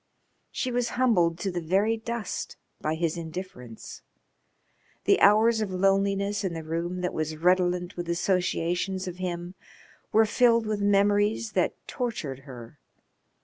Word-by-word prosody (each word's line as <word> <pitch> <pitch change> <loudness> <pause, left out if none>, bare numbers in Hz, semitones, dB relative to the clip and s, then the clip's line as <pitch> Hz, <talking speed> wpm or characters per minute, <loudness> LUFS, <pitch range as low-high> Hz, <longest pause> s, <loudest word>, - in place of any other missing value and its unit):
She 255 - -3
was 245 0 0
humbled 180 -10 +3
to 195 - -1
the 175 -1 -3
very 195 +7 +2
dust 230 -1 -5 0.2
by 155 +1 -1
his 165 0 -1
indifference. 160 - -8 1.0
The - - +3
hours 220 +2 +5
of 215 - -1
loneliness 195 +2 +1
in 180 -3 -2
the 165 - -5
room 170 +3 -3
that 180 - -2
was 155 0 -3
redolent 180 +1 +1
with 175 -1 -5
associations 180 +1 0
of 180 -1 -6
him 175 -1 -4 0.6
were 220 +1 +5
filled 230 +1 +3
with 215 -1 -2
memories 205 +2 +2
that 185 -3 +1
tortured 170 - -4
her. 120 +2 -11
185 Hz, 140 wpm, -27 LUFS, 170-210 Hz, 1.0 s, hours